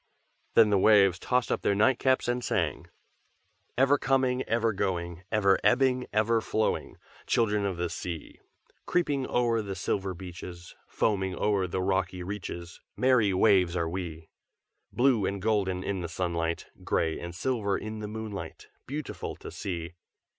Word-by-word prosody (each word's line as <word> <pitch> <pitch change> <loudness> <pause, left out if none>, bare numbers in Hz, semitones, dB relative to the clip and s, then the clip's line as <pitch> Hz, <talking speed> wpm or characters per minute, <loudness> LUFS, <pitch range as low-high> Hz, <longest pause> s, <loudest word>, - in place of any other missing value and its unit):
Then 110 -2 +6
the 100 - +4
waves 95 -3 +5
tossed 125 +2 0
up - - 0
their 100 - +2
nightcaps 130 +5 +3
and 120 0 -1
sang: - - -1 0.9
"Ever 135 +2 +4
coming, 130 -1 +2
ever 115 -1 +1
going, 85 -3 -2
Ever 100 -3 +3
ebbing, 130 0 +3
ever 110 +2 +2
flowing, 110 0 -1 0.3
Children 105 -3 +2
of 95 -3 -3
the 90 0 -1
sea. 85 -1 -6 0.5
Creeping 145 -7 +1
o'er 120 -2 +1
the 100 -2 -5
silver 95 0 -2
beaches, 85 -1 -9
Foaming 95 -3 0
o'er 100 -3 +1
the 90 +1 -2
rocky 95 -1 0
reaches, 90 -3 -6 0.2
Merry 125 -6 +4
waves 95 -2 +4
are 85 -2 0
we! 80 -2 -5 0.6
"Blue 120 -6 +3
and 100 0 -2
golden 95 -3 0
in 95 -1 -2
the 85 - -4
sunlight, 85 -1 -2 0.2
Gray 80 -1 0
and 85 0 -7
silver 105 -2 0
in 110 0 -6
the 105 - -5
moonlight, 105 -6 -7 0.2
Beautiful 145 +2 -5
to - - -9
see. 85 -4 -5
100 Hz, 145 wpm, -28 LUFS, 90-115 Hz, 0.9 s, Then